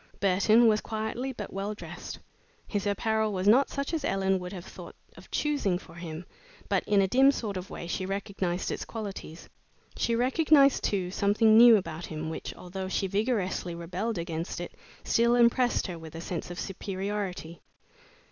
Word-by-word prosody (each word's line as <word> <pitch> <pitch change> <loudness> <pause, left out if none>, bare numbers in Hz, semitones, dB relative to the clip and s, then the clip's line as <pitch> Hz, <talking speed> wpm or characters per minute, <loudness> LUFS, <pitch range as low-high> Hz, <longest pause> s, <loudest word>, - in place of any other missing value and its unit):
Burton 200 +4 +4
was 215 -1 +4
quietly 220 +4 -3
but 210 -5 -7
well 200 +2 -3
dressed. - - -8 0.5
His 205 -1 -2
apparel 220 +1 +1
was 190 0 -2
not 255 +6 +5
such 280 +3 -3
as 315 -3 -1
Ellen 195 -4 +1
would 180 0 -7
have 185 -3 -8
thought - - -11 0.2
of - - -15
choosing 285 -12 0
for 165 - -14
him, 170 0 -7 0.4
but - - +1
in 200 -1 +3
a - - +2
dim 265 +7 +5
sort 220 -7 -2
of 185 +1 -5
way - - -7
she 185 +2 -3
recognized 195 -2 -2
its - - -3
qualities. 200 -7 -7 0.5
She 230 - 0
recognized, 275 +3 +4
too, 185 -3 -1
something 210 +3 +3
new 235 0 +9
about 165 -3 -5
him 160 0 -5
which, - - -5
although 185 +1 -6
she 190 - -1
vigorously 195 -4 -1
rebelled 180 +6 -3
against 170 0 -4
it, 175 - -5 0.3
still 235 +1 +3
impressed 245 +1 +3
her 175 -3 -5
with 160 0 -10
a - - -5
sense 170 -1 -5
of 175 - -6
superiority. 195 -3 -4
200 Hz, 175 wpm, -28 LUFS, 180-225 Hz, 0.5 s, new